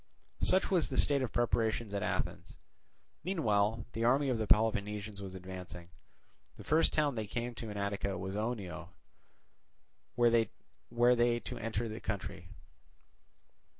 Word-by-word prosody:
Such 190 +1 +3
was 180 -4 +3
the 130 - -3
state 140 -2 +3
of 130 - -2
preparation 115 -2 0
at 100 - -1
Athens. - - -3 0.7
Meanwhile 110 - +1
the 115 - -2
army 135 +4 +3
of 120 -3 0
the 110 - -1
Peloponnesians 105 -1 +1
was 95 -1 -7
advancing. 90 -2 -8 0.7
The - - -10
first 160 +2 +3
town 150 -2 +2
they 110 -3 -3
came 120 +3 -3
to 115 -1 -6
in 105 - -5
Attica 100 -1 -2
was 95 +1 -4
Oenoe, 100 -6 -3 1.3
where 120 -1 +4
they 120 +1 +1
to - - -6
enter 115 0 -2
the 110 +1 -6
country. 100 -1 -5
110 Hz, 140 wpm, -33 LUFS, 100-120 Hz, 1.3 s, where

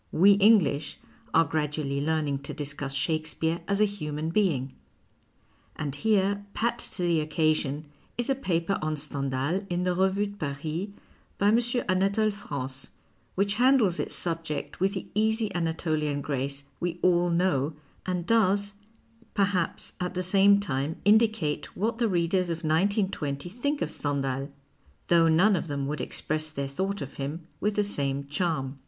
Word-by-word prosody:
We 195 +5 +6
English 200 -8 +4 0.3
are 165 - +5
gradually 150 -2 -1
learning 150 -2 0
to 140 - -7
discuss 140 -1 -3
Shakespeare 160 +3 0
as 200 0 +1
a 215 - +6
human 155 -6 -3
being. 150 -10 +1 1.0
And 145 -3 -3
here, 200 +3 +1
pat 235 +1 0
to 180 - -3
the 170 -2 +3
occasion, 155 -1 0 0.3
is 240 - 0
a 270 - +3
paper 190 -8 -1
on 155 0 -1
Stendhal 140 +4 -2
in 175 0 -1
the 180 0 +1
Revue 190 +3 +2
de 205 0 -8
Paris 155 +5 -3 0.5
by 200 - +3
M. 225 +2 +5 0.3
Anatole 195 +3 +2
France, 135 -9 -5 0.5
which 200 +2 +1
handles 250 -9 +4
its - - -3
subject 165 -4 -3
with 195 +2 +1
the 190 - -4
easy 220 +1 +1
Anatolian 160 -3 -1
grace 140 0 -3 0.2
we 175 -1 -2
all 175 -1 +4
know 170 -4 +1 0.3
and 180 -2 -2
does, 205 -2 +3 0.6
perhaps, 195 -5 0
at 180 0 -3
the 185 - -1
same 200 +2 +5
time 150 -5 -1
indicate 215 -7 +2
what 225 +4 -1
the 230 -2 +2
readers 175 0 +1
of 165 0 -3
1920 160 -4 0
think 285 +8 -1
of - - -3
Stendhal, 135 -1 -2 0.6
though 170 -1 +5
none 185 +6 +5
of 170 - -2
them 140 -2 -2
would 145 -1 -3
express 155 +4 -2
their 140 -3 -3
thought 190 +7 -3
of 135 - -9
him 155 +4 -4 0.2
\vith 210 0 0
the 210 - +2
same 140 -8 -1
charm. 145 -3 -2
170 Hz, 155 wpm, -27 LUFS, 145-200 Hz, 1.0 s, We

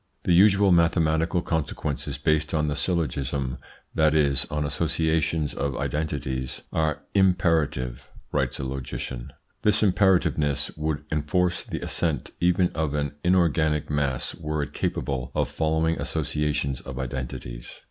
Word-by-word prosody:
"The 90 - +2
usual 95 +1 +6
mathematical 85 0 +3
consequences 80 -3 -2
based 75 0 +1
on 75 -1 +1
the 70 - -1
syllogism 70 -6 -1 0.3
that 80 -1 +3
is, 70 -3 +3
on 75 0 -1
associations 80 +1 0
of 70 -2 -2
identities 65 -4 -3
are 80 -2 0
imperative.. 80 - +1
." - - -29
writes - - 0
a - - -4
logician. 65 -2 -5 0.3
"This 105 +1 +3
imperativeness 90 -7 +2
would 75 -1 -2
enforce 85 +4 +1
the - - -5
assent 75 -7 -1
even 90 0 +3
of 80 -2 -2
an 70 -1 -1
inorganic 80 -5 +2
mass 70 -3 0
were 75 -1 -2
it 70 - -7
capable 65 -3 -2
of - - +1
following 80 +1 0
associations 75 -3 -1
of 65 -1 -8
identities." 60 -2 -5
75 Hz, 130 wpm, -25 LUFS, 70-80 Hz, 0.3 s, usual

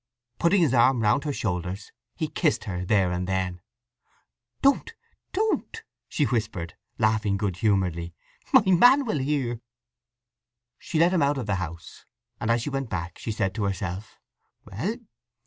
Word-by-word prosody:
Putting 180 +3 +4
his 150 -6 +3
arm 125 -1 +4
round 125 +7 +2
her 150 - 0
shoulders 95 -4 -3 0.2
he - - -2
kissed - - 0
her 90 -2 -4
there 95 -1 +2
and 90 0 -2
then. 95 -2 -2 1.0
"Don't 280 +11 +2 0.4
don't," 440 +2 -1 0.3
she 150 - 0
whispered, 105 -9 -2 0.2
laughing 110 -2 +1
good 95 -3 -2
humouredly. 90 -5 0 0.4
"My - - +7
man 245 +10 +6
will 215 -11 -1
hear." 130 -4 -1 1.2
She 165 - -4
let 170 +3 +4
him 175 - +2
out 140 0 +2
of 130 - -3
the 100 -2 0
house, 85 0 -8 0.3
and - - -2
as 115 0 +2
she 145 - -3
went 135 -3 -3
back 90 -1 -4
she 115 - -4
said 100 -3 -1
to 105 -1 -2
herself: 95 +1 -4 0.5
"Well! 120 - -3
110 Hz, 155 wpm, -26 LUFS, 95-145 Hz, 1.2 s, My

